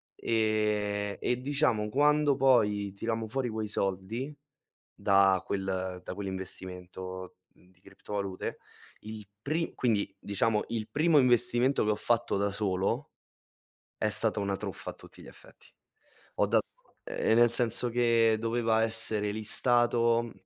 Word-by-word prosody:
ehm, 105 -2 0
e 125 0 0
diciamo 135 -6 +1
quando 145 +3 +3
poi 105 -7 +2
tirammo 115 +2 -3
fuori 130 +2 -2
quei 110 -1 -3
soldi 105 +9 -3 0.6
da 95 -1 +3
quel 95 -2 -3
da - - -6
quell'investimento 95 -1 -6
di 90 0 -27
criptovalute, 100 0 -6 0.4
il 110 -1 -9
pri 160 +5 -2
quindi 110 -5 0
diciamo 105 +1 0
il 110 -2 -4
primo 155 +5 +3
investimento 125 0 +3
che 105 - +1
ho - - -1
fatto 120 +1 0
da 100 +1 0
solo 95 -2 -1 0.8
è 110 - 0
stato 105 0 +4
una 100 -1 -1
truffa - - -5
a - - -11
tutti - - -15
gli - - -13
effetti. - - -16 0.7
Ho - - +2
dat - - +2 0.4
ehm, - - 0
nel 120 0 +5
senso 120 +1 +2
che 115 -2 +3
doveva 115 -1 +1
essere 110 -2 0
listato, 115 +1 +1
110 Hz, 130 wpm, -29 LUFS, 100-120 Hz, 0.8 s, nel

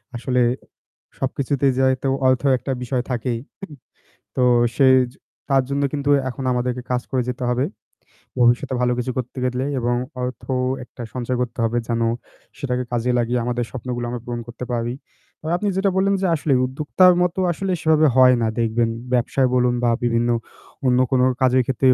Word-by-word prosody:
আসলে 125 +1 0 0.8
সবকিছুতে 140 +1 -1
যেহেতু 130 0 +2 0.2
অর্থ 130 0 +2 0.2
একটা 135 - -4
বিষয় 125 0 -1
থাকেই। 120 -1 -1 0.2
হুম। - - -5 0.7
তো 130 - +2 0.3
সে 135 - +5 0.6
তার 135 -1 +4
জন্য 140 +1 0
কিন্তু 145 -1 -1 0.2
এখন 130 +2 -6
আমাদেরকে 125 0 -1
কাজ 125 0 +1
করে 130 -1 +1
যেতে 125 0 -4
হবে। 125 +2 +1 0.7
ভবিষ্যতে 120 +1 +3
ভালো 125 - +2
কিছু 125 +1 -2
করতে 125 +1 -4
গেলে 125 +1 -1
এবং 120 0 0 0.3
অর্থ 125 -1 -5 0.4
একটা 125 +1 -12
সঞ্চয় 125 0 -2
করতে 125 -1 -4
হবে 115 +1 0
যেন 115 -1 -1 0.6
সেটাকে 125 -2 -2
কাজে 120 +1 0
লাগিয়ে 120 +1 0
আমাদের 120 0 -1
স্বপ্নগুলো 125 -1 -4
আমরা 120 -1 -5
পূরণ 120 -1 -4
করতে 120 +1 -7
পারি। 120 0 -1 0.5
তো - - -14
আপনি 205 +3 -2
যেটা 195 +1 +2
বললেন 195 +1 +3
যে 190 - +2
আসলে 150 -2 0
উদ্যোক্তার 150 +7 +3
মতো 180 +1 0
আসলে 190 +3 -3
সেভাবে 155 -1 +4
হয় 130 -1 +7
না 115 - +2
দেখবেন। 115 0 +1 0.2
ব্যবসায় 125 +2 +2
বলুন 125 -1 +2
বা 120 - +3
বিভিন্ন 120 0 +1 0.6
অন্য 125 -1 +3
কোনো 130 -1 +4 0.2
কাজের 130 0 +4
ক্ষেত্রেই 130 0 +3
125 Hz, 165 wpm, -21 LUFS, 120-135 Hz, 0.8 s, হয়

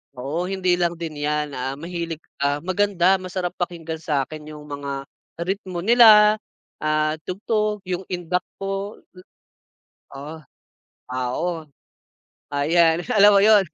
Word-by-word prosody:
Oo, 140 +7 -3
hindi 185 -1 +1
lang 175 -1 -1
din 155 -3 -5
'yan, 150 -1 -1
ah, 130 +1 -3
mahilig 170 -1 -5 0.2
ah, 145 +1 +1
maganda, 185 +1 +2
masarap 185 -1 -4
pakinggan 165 -2 -4
sa'kin 155 -1 -3
yung 150 -1 -11
mga, 140 -1 -5 0.4
ritmo 190 -2 -3
nila, 215 0 +7 0.5
at 155 0 +1
tugtog 210 +2 -1
yung, 185 +1 -2
indak 180 0 -1 0.2
po. 195 +1 -4 0.2
Du - - -13 0.9
oh. 150 +4 -8 0.7
Oo. 155 +7 -2 0.8
Ayan, 165 +4 +3
alam 210 -4 +6
mo 200 - +6
yun. 210 0 +6
175 Hz, 120 wpm, -23 LUFS, 150-190 Hz, 0.9 s, nila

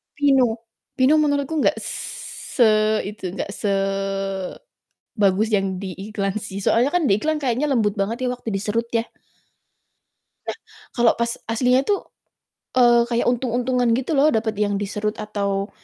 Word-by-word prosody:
Pino. 275 -3 +4 0.5
Pino 265 +3 +5
menurut 285 -2 +1
ku 320 -1 -1
nggak - - +3 0.8
se 245 - +5 0.4
itu, 195 -2 -6
nggak 200 - -4
sebagus 195 - -3 0.7
yang 195 -2 +1
di 190 0 -5 0.2
iklan 200 -1 -2
sih, 195 -1 -6
soalnya 245 +4 +3
kan 350 - +2
diiklan 280 +8 +2
kayaknya 265 +2 0
lembut 220 -7 +2
banget 230 +6 -1
ya 250 - +1
waktu 245 -1 -9
diserut 220 +4 -1
ya 225 - +2 1.4
Nah, - - -4 0.4
kalau 235 -2 +5
pas 235 0 +1 0.2
aslinya 250 +3 +3
tuh, 405 - +3 0.8
eee, 240 -1 +6
kayak 235 0 +1
untung-untungan 245 0 0
gitu 260 +4 -3
loh, 285 - +5
dapet 220 -2 0
yang 205 0 0
diserut 210 +1 -2
atau 200 -1 -2
230 Hz, 140 wpm, -22 LUFS, 200-255 Hz, 1.4 s, eee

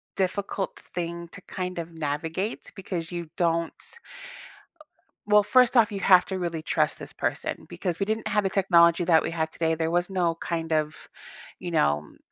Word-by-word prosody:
difficult 195 +1 -2 0.2
thing 170 0 -4
to 200 - -11
kind 180 -1 -5
of 165 0 -6
navigate, 160 +6 -3
because 180 -4 -5
you 170 -2 -5
don't 170 -1 +1 1.5
Well, 210 0 +6
first 250 +3 +4
off, 230 -3 +5
you 200 - -3
have 185 -2 +6
to 190 -1 -3
really 170 -3 -3
trust - - +1
this - - -8
person, - - -3
because 175 -4 -4
we 195 - +1
didn't 220 +1 -2
have 210 -1 +1
the - - +2
technology 175 -3 +4
that 165 -2 +5
we - - -3
have 160 -1 -2
today. 160 -1 0
There 160 0 -1
was 175 +1 +1
no 175 -3 +1
kind 165 -1 -4
of, 155 0 -1 0.5
you 175 - -5
know 75 - 0
175 Hz, 175 wpm, -26 LUFS, 165-195 Hz, 1.5 s, Well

